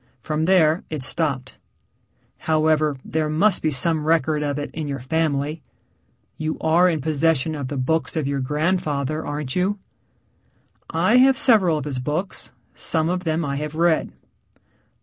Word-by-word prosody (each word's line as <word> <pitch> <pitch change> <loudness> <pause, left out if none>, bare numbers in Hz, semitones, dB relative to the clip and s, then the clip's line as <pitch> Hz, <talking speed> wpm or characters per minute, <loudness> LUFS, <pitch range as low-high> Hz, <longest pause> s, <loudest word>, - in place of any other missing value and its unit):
From 155 +5 -2
there 170 -3 +3
it 155 -4 -3
stopped. 130 -2 -3 0.8
However, 155 -2 +1
there 155 -1 -1
must 180 +6 +2
be 155 - +1
some 155 +3 +2
record 155 -2 +2
of 145 -1 -2
it 145 - -5
in 155 -2 -4
your 140 -1 -3
family. 150 +2 -1 0.8
You 155 0 -3
are 170 +3 +4
in 160 -4 -1
possession 155 0 +1
of 145 -3 -4
the 145 - -4
books 160 +6 -1
of 155 - 0
your 140 0 -1
grandfather, 150 0 -1
aren't 145 -3 -4
you?" 190 +3 0 1.1
"I 245 - +3
have 265 +1 +5
several 215 - +4
of 150 - -5
his 135 -4 -3
books. 150 +9 -2 0.2
Some 160 0 -1
of 180 0 -2
them 160 0 0
I 140 -1 -2
have 150 +1 -5
read." 165 -1 +2
155 Hz, 155 wpm, -22 LUFS, 145-165 Hz, 1.1 s, have